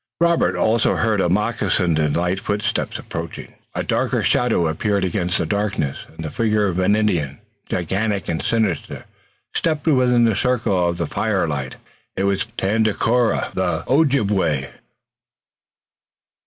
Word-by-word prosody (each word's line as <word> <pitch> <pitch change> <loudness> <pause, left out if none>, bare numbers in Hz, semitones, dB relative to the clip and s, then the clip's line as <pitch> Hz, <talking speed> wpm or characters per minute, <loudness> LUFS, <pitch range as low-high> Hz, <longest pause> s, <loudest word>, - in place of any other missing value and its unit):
Now 170 0 +4
Robert 170 - +2
also 110 +1 +2
heard 110 -3 +1
a 90 - +1
moccasined 95 -4 +1
and 75 -1 +1
light 90 +2 0
footstep 105 +3 -2
approaching. 85 -1 -7 0.2
A - - -1
darker - - 0
shadow 115 -8 +2
appeared 100 +5 0
against 90 -1 -1
the - - -1
darkness, 100 -7 -2
and 80 0 -9
the 75 - -4
figure 105 -2 +1
of 90 -1 -1
an 95 +3 +3
Indian, 85 -10 0 0.3
gigantic 100 +3 -1
and 80 -1 -1
sinister, 110 -8 -1 0.5
stepped 155 -3 -1
within 125 -5 +4
the 115 -3 +3
circle 100 -9 +1
of 85 - -3
the 85 - -1
firelight. 75 -8 -1 0.4
It 95 - -1
was 100 -1 0
Tandakora, 110 +3 +1
the 90 -4 -1
Ojibway. 105 - +1
100 Hz, 140 wpm, -21 LUFS, 85-110 Hz, 0.5 s, Now